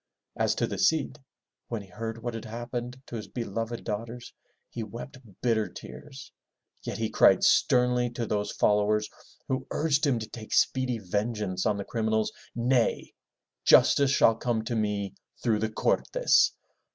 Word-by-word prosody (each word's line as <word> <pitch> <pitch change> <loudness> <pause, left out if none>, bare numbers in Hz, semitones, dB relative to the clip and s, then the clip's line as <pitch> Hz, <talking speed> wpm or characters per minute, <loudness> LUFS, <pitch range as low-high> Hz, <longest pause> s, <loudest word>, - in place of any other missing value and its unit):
As - - +1
to - - +1
the - - -5
Cid, 155 -1 +1 0.5
when 115 -3 -4
he - - -15
heard 115 +4 -5
what 120 -1 -3
had 115 0 -6
happened 120 +2 -5
to - - -8
his 105 - -7
beloved 115 0 -4
daughters, 115 +3 -5 0.3
he 120 - -6
wept 120 +5 -8 0.2
bitter 115 -3 +1
tears, 140 -2 -11 0.5
yet - - -5
he 110 - 0
cried 110 - +5
sternly 125 -1 +3
to 120 0 -4
those 105 -1 -1
followers 105 +1 +2 0.4
who 130 0 -2
urged 150 -1 +1
him 130 -4 +2
to 110 -1 -5
take 110 -1 -8
speedy 130 -2 +2
vengeance 100 -1 -2
on 105 - +1
the 100 - -4
criminals, 110 -1 0 0.2
"Nay! 120 0 +1 0.5
Justice 140 -1 +6
shall 125 -4 +5
come 115 0 -1
to 120 - -3
me 105 -2 -1 0.3
through 110 -3 +2
the 110 - -1
Cortes. - - +2
115 Hz, 155 wpm, -28 LUFS, 110-125 Hz, 0.5 s, Justice